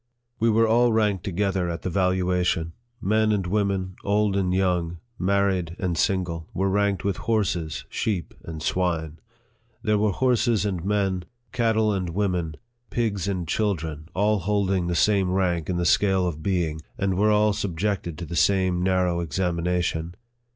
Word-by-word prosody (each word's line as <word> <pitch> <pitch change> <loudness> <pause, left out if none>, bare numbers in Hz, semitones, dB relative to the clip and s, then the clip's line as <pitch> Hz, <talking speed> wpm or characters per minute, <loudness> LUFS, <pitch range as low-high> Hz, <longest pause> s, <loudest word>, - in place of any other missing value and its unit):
We 115 - +3
were 115 +1 +4
all 120 +2 +4
ranked 105 -5 +1
together 95 -1 -1
at 85 0 -5
the - - -1
valuation. 90 -2 +1 0.3
Men 110 +1 +2
and 100 -3 0
women, 95 -1 -1
old 105 0 +1
and 95 -2 +1
young, 90 -2 0 0.2
married 95 -3 +1
and 90 -3 -1
single, 85 -2 -1
were 95 +1 +1
ranked 100 -1 +1
with 100 -2 -1
horses, 90 -8 -1
sheep, 100 -6 -2
and 80 -1 -7
swine. 80 -4 -1 0.6
There 105 -3 +2
were 105 0 +2
horses 120 -3 +2
and 95 -5 -2
men, 95 -2 0 0.3
cattle 110 -3 +2
and 90 -3 -2
women, 90 -4 -1 0.3
pigs 105 -6 -1
and 90 -4 -2
children, 80 -6 -2
all 105 +2 +2
holding 95 -1 0
the 85 - -1
same 100 +1 +3
rank 90 -3 0
in 90 - 0
the 85 - 0
scale 95 +1 +3
of 80 -3 -4
being, 80 -3 -1 0.2
and 95 -1 0
were 105 +3 +3
all 105 0 +3
subjected 95 -3 -2
to 85 - -5
the 85 - -6
same 95 0 +2
narrow 90 -1 +1
ex 85 -2 -4
amination. 85 -1 -1
95 Hz, 160 wpm, -25 LUFS, 85-105 Hz, 0.6 s, were